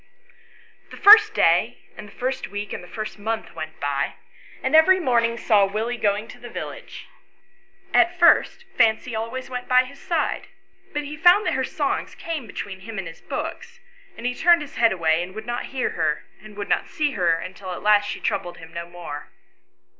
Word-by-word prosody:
The -, -, -11 dB
first 430 Hz, +1 st, +8 dB
day -, -, +3 dB, 0.2 s
and 210 Hz, -, -10 dB
the -, -, -15 dB
first 260 Hz, +3 st, -3 dB
week 205 Hz, 0 st, -6 dB
and -, -, -6 dB
the -, -, -12 dB
first 215 Hz, +1 st, -6 dB
month 220 Hz, +2 st, -4 dB
went 160 Hz, -1 st, -7 dB
by, 140 Hz, -1 st, -2 dB, 0.5 s
and 260 Hz, +4 st, +1 dB
every 370 Hz, +4 st, +6 dB
morning 235 Hz, -6 st, +1 dB
saw 210 Hz, -4 st, +3 dB
Willie 220 Hz, +5 st, -2 dB
going 210 Hz, +1 st, 0 dB
to -, -, -12 dB
the -, -, -10 dB
village; -, -, -8 dB, 0.9 s
at 350 Hz, +1 st, +4 dB
first 340 Hz, -1 st, +4 dB
Fancy 225 Hz, -, +2 dB
always 230 Hz, +4 st, -4 dB
went 250 Hz, -1 st, -6 dB
by 255 Hz, 0 st, +5 dB
his 275 Hz, +2 st, -13 dB
side, 330 Hz, -3 st, -2 dB, 0.4 s
but 295 Hz, -, -3 dB
he 290 Hz, +1 st, -7 dB
found 355 Hz, +7 st, +5 dB
that -, -, +1 dB
her -, -, 0 dB
songs -, -, -2 dB
came 315 Hz, -8 st, -5 dB
between 200 Hz, -1 st, -7 dB
him 220 Hz, +2 st, -9 dB
and 190 Hz, -3 st, -4 dB
his 165 Hz, -, -11 dB
books, 475 Hz, 0 st, -6 dB, 0.4 s
and 235 Hz, -, -8 dB
he 250 Hz, -, 0 dB
turned 340 Hz, +3 st, +4 dB
his 295 Hz, +2 st, -12 dB
head 230 Hz, -1 st, +4 dB
away 165 Hz, -2 st, +1 dB
and 180 Hz, +2 st, -7 dB
would 220 Hz, 0 st, -7 dB
not 240 Hz, +1 st, -3 dB
hear 265 Hz, -2 st, -2 dB
her, 155 Hz, -2 st, -1 dB, 0.2 s
and 210 Hz, 0 st, -13 dB
would 205 Hz, -, -4 dB
not -, -, 0 dB
see 300 Hz, -2 st, -1 dB
her, 175 Hz, -8 st, +2 dB
until 185 Hz, +2 st, -7 dB
at -, -, -7 dB
last 205 Hz, 0 st, +4 dB
she -, -, -4 dB
troubled 175 Hz, 0 st, -2 dB
him 165 Hz, 0 st, -13 dB
no 170 Hz, 0 st, -6 dB
more. 170 Hz, -4 st, -8 dB
225 Hz, 200 wpm, -23 LUFS, 190-285 Hz, 0.9 s, first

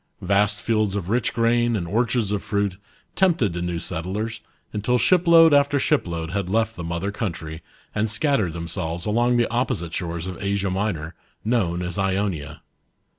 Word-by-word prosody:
Vast 100 Hz, +2 st, +2 dB
fields 110 Hz, -3 st, +1 dB
of 95 Hz, -3 st, -3 dB
rich 120 Hz, +2 st, +1 dB
grain 120 Hz, 0 st, +2 dB
and 90 Hz, -5 st, -2 dB
orchards 115 Hz, +1 st, +1 dB
of 105 Hz, -1 st, -1 dB
fruit, 100 Hz, -3 st, -1 dB, 0.4 s
tempted 165 Hz, -, +2 dB
the 85 Hz, -, -3 dB
new 90 Hz, -1 st, -2 dB
settlers, 100 Hz, +8 st, -3 dB, 0.3 s
until 110 Hz, +4 st, +1 dB
shipload 170 Hz, +2 st, +6 dB
after 145 Hz, 0 st, +4 dB
shipload 85 Hz, -, 0 dB
had 100 Hz, -2 st, -2 dB
left 110 Hz, +1 st, +1 dB
the 85 Hz, -, -6 dB
mother 85 Hz, +4 st, -2 dB
country, 80 Hz, -6 st, -5 dB, 0.3 s
and 110 Hz, +1 st, 0 dB
scattered 105 Hz, -, +1 dB
themselves 85 Hz, 0 st, -4 dB
along 120 Hz, +3 st, +2 dB
the 120 Hz, -, +3 dB
opposite 115 Hz, -9 st, -1 dB
shores 85 Hz, -1 st, -3 dB
of 95 Hz, 0 st, -6 dB
Asia 100 Hz, -1 st, 0 dB
Minor, 90 Hz, -5 st, -2 dB, 0.3 s
known 90 Hz, -7 st, +1 dB
as 90 Hz, +1 st, -4 dB
Ionia. 95 Hz, -6 st, -2 dB
100 Hz, 160 wpm, -23 LUFS, 85-115 Hz, 0.4 s, shipload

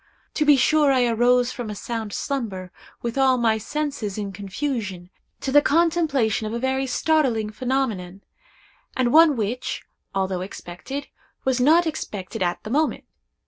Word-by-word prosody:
To 305 Hz, -, +1 dB
be 295 Hz, -1 st, +7 dB
sure 295 Hz, +2 st, +4 dB
I 255 Hz, -2 st, +3 dB
arose 245 Hz, +1 st, +3 dB
from 245 Hz, -3 st, -6 dB
a 210 Hz, -, -5 dB
sound 225 Hz, 0 st, -4 dB
slumber, 200 Hz, -9 st, -3 dB, 0.3 s
with 235 Hz, +3 st, -2 dB
all 260 Hz, -1 st, +4 dB
my 225 Hz, -2 st, +2 dB
senses 275 Hz, -5 st, -3 dB
in 205 Hz, -2 st, -3 dB
confusion, 195 Hz, -2 st, -4 dB, 0.3 s
to 265 Hz, -, -2 dB
the 290 Hz, +2 st, +7 dB
contemplation 300 Hz, -10 st, +2 dB
of 215 Hz, -, -5 dB
a -, -, -1 dB
very 265 Hz, +1 st, 0 dB
startling 255 Hz, -6 st, +1 dB
phenomenon, 215 Hz, -7 st, -2 dB, 0.7 s
and 245 Hz, -2 st, +2 dB
one 320 Hz, -2 st, +7 dB
which, 230 Hz, +2 st, -3 dB, 0.3 s
although 190 Hz, -1 st, -1 dB
expected, 195 Hz, +9 st, -7 dB, 0.4 s
was 260 Hz, -1 st, +1 dB
not 325 Hz, +6 st, +5 dB
expected 215 Hz, -, -5 dB
at 175 Hz, -1 st, -1 dB
the 215 Hz, -, -6 dB
moment. 305 Hz, +4 st, +1 dB
245 Hz, 150 wpm, -23 LUFS, 210-280 Hz, 0.7 s, be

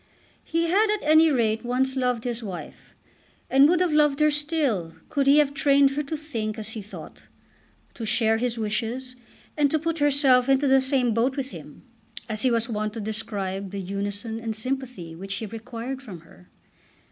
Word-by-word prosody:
He 330 Hz, +1 st, -1 dB
had, 405 Hz, +6 st, +3 dB
at 425 Hz, -, -2 dB
any 315 Hz, +1 st, +6 dB
rate, 225 Hz, -5 st, +1 dB
once 260 Hz, +2 st, 0 dB
loved 250 Hz, -3 st, 0 dB
his 240 Hz, -1 st, -3 dB
wife, 190 Hz, -6 st, -9 dB, 0.6 s
and 275 Hz, +2 st, +6 dB
would 350 Hz, 0 st, +3 dB
have 360 Hz, -3 st, +2 dB
loved 295 Hz, -2 st, +3 dB
her 305 Hz, 0 st, +4 dB
still 290 Hz, -, -1 dB
could 280 Hz, -3 st, 0 dB
he 280 Hz, +2 st, +6 dB
have 290 Hz, -2 st, +3 dB
trained 280 Hz, -1 st, +4 dB
her 285 Hz, +2 st, -1 dB
to 300 Hz, +2 st, -4 dB
think 230 Hz, -8 st, -4 dB
as 220 Hz, -1 st, -5 dB
he 220 Hz, -, -5 dB
thought, 205 Hz, -, -11 dB, 0.7 s
to 235 Hz, -, -8 dB
share 220 Hz, +1 st, +2 dB
his 240 Hz, 0 st, -2 dB
wishes, 230 Hz, +4 st, -3 dB, 0.4 s
and 290 Hz, -2 st, +3 dB
"to 315 Hz, -, +1 dB
put 330 Hz, +1 st, -2 dB
herself 275 Hz, -3 st, +3 dB
into 270 Hz, +1 st, +3 dB
the 265 Hz, 0 st, +5 dB
same 260 Hz, -3 st, +1 dB
boat 250 Hz, +5 st, 0 dB
with 270 Hz, -1 st, -3 dB
him," -, -, -11 dB, 0.4 s
as 215 Hz, -2 st, -2 dB
he 260 Hz, -, +4 dB
was 230 Hz, -1 st, +1 dB
wont 215 Hz, -2 st, -3 dB
to 225 Hz, -, -6 dB
describe 205 Hz, -3 st, -3 dB
the 200 Hz, +1 st, -5 dB
unison 205 Hz, +4 st, -4 dB
and 225 Hz, -1 st, -4 dB
sympathy 250 Hz, -7 st, -4 dB
which 195 Hz, +3 st, -6 dB
he 220 Hz, -, -4 dB
required 235 Hz, +4 st, -6 dB
from 195 Hz, -11 st, -10 dB
her. 90 Hz, -, -19 dB
250 Hz, 190 wpm, -25 LUFS, 215-280 Hz, 0.7 s, any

